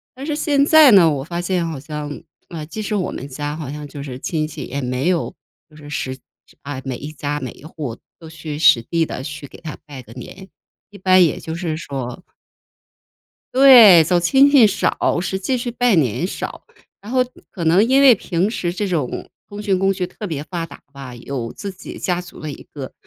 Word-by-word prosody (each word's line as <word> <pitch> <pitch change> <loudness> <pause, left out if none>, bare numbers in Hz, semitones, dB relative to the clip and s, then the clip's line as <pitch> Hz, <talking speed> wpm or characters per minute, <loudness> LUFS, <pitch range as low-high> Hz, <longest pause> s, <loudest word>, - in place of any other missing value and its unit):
但 265 +2 -7
是 300 -1 -2
现 290 -2 +2
在 310 -3 +7
呢， 185 -6 +7
我 135 -2 -3
发 170 +2 -4
现 175 -1 -1
好 160 -4 -5
像， 150 0 -6 0.3
呃， 160 -3 -6
即 190 +8 -7
使 215 +1 -3
我 185 - -1
们 135 - -7
家 145 +2 -5
好 150 -5 -6
像 150 0 -7
就 145 - -9
是 130 -3 -7
亲 155 +1 -2
戚， 155 -2 -8
也 140 +2 -4
没 125 +4 -2
有 175 -3 -1 0.4
就 155 - -20
是 150 -1 -12
实 130 -2 -4 0.5
啊， 140 -2 -6
每 130 -2 -3
一 150 +2 -8
家 145 0 -3
每 130 -3 -5
一 - - -17
户 145 -7 -6 0.2
都 160 - -11
去 160 -2 -7
实 120 -6 +6
地 165 +7 0
地 130 - -6
去 150 -1 -7
给 - - -14
他 155 -2 -7
拜 140 -3 -9
个 115 - -16
年， 185 +10 -11 0.4
一 205 - -13
般 185 -1 +5
也 165 - +1
就 160 - -6
是 165 -3 -3
说 135 -1 -6 1.3
对， 245 -10 +9
走 175 +2 +2
亲 270 +11 +5
戚 260 -6 +7
少， 195 -3 0
实 190 0 -3
际 250 +7 -1
是 240 0 -4
拜 245 -3 +2
年 150 - +1
少。 - - -6 0.4
然 210 +4 -9
后 260 - +1 0.3
可 175 - -6
能 170 +6 +4
因 265 +2 +4
为 270 -3 +8
平 185 -1 -1
时 175 -6 -2
这 205 +1 -2
种 155 -8 -3 0.2
通 205 0 -8
讯 195 -3 0
工 195 +1 +2
具 185 -1 -2
特 205 +4 -8
别 150 -5 -4
发 165 +2 -4
达 - - -14
吧， 135 -3 -9
有 120 -1 -5
自 200 -1 -6
己 185 - -10
家 180 -1 -1
族 180 - -13
的 155 -1 -5
一 - - -10
个， 135 -3 -7
165 Hz, 235 characters per minute, -20 LUFS, 145-195 Hz, 1.3 s, 对